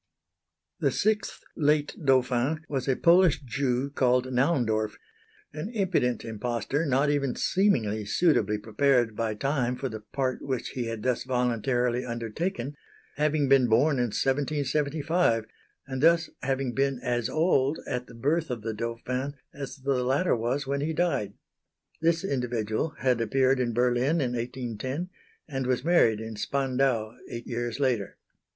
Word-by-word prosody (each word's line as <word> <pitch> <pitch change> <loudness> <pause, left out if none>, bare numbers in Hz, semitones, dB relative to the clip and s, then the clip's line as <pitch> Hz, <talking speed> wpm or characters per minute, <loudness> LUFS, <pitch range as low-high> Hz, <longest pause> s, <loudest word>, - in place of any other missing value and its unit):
The - - +2
sixth 215 -1 -1
"Late 150 -1 +1
Dauphin" 130 +3 +2
was 135 -2 -3
a 135 - +3
Polish 170 0 +5
Jew 130 +1 -1
called 130 -1 +1
Naundorf 110 -6 +1 0.6
an 155 +7 -5
impudent 170 - 0
impostor 120 +6 -2
not 140 +2 +2
even 140 -3 0
seeming 115 - +1
suitably 110 - +2
prepared 115 +1 +1
by 110 -1 -1
time 125 0 0
for 135 +1 -3
the 110 -1 -6
part 130 +4 -2
which 130 -3 -3
he 125 -3 -3
had 115 -2 -5
thus 125 -1 0
voluntarily 125 0 0
undertaken, 120 - -3 0.4
having 150 -1 +2
been 135 -2 +5
born 135 +6 +3
in 120 - +2
1775, 145 - 0 0.4
and 130 -1 -4
thus 165 +1 +4
having 135 -2 -1
been 135 -1 0
as 120 -2 0
old 155 -3 +2
at 125 0 -3
the - - -13
birth 150 +7 0
of 120 -3 -4
the 115 0 -2
Dauphin 125 +5 -3 0.2
as 140 -1 -6
the 135 -2 -1
latter 135 +7 +2
was 120 +5 -1
when 140 +1 -1
he 160 +2 -1
died. 155 - 0 0.7
This 165 +1 +2
individual 125 - -1
had 125 -3 +2
appeared 130 +2 +2
in 120 -2 0
Berlin 125 +6 +2
in 125 -4 0
1810, 125 - -4 0.4
and 135 -4 -3
was 130 +1 0
married 140 -11 +4
in 110 -1 -6
Spandau 130 -3 0 0.2
eight 120 0 -6
years 120 +1 -3
later. 125 -8 0
130 Hz, 145 wpm, -27 LUFS, 120-145 Hz, 0.7 s, Polish